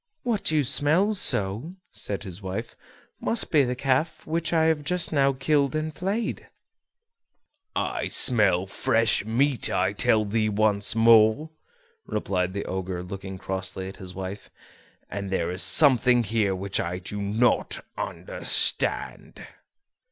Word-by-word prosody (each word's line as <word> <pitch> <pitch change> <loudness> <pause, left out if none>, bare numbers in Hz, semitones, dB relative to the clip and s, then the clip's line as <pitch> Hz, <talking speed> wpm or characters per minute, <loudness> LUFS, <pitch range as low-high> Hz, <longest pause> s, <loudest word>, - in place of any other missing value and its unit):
"What 230 -4 0
you 155 -2 +2
smell 160 - +1
so," 115 - 0 0.2
said 100 -1 -2
his 95 -1 -8
wife, 100 +5 -6 0.4
"must 230 - -1
be 150 -3 +4
the 125 -1 -2
calf 140 +5 -1
which 165 +1 -2
I 165 -2 +2
have 160 -2 +1
just 175 +3 0
now 140 -2 +3
killed 140 +2 0
and 155 0 -3
flayed." 200 +8 -3 1.3
"I - - -2
smell 100 -7 +4
fresh 115 +3 0
meat, 125 +2 0
I - - 0
tell 110 -1 +2
thee 110 +1 0
once 105 0 +2
more," 115 +6 +4 0.6
replied 90 -1 -2
the 100 - -4
Ogre, 95 -1 -4
looking 95 +1 -8
crossly 95 0 -4
at 95 - -9
his 95 -1 -9
wife; 95 +2 -7 0.6
"and 100 -1 -6
there 85 -3 -1
is 90 +1 -3
something 125 -4 +5
here 105 -3 0
which 95 +1 -3
I 85 +1 -3
do 100 +3 -7
not 110 +5 0
understand." - - -1
115 Hz, 135 wpm, -25 LUFS, 95-150 Hz, 1.3 s, something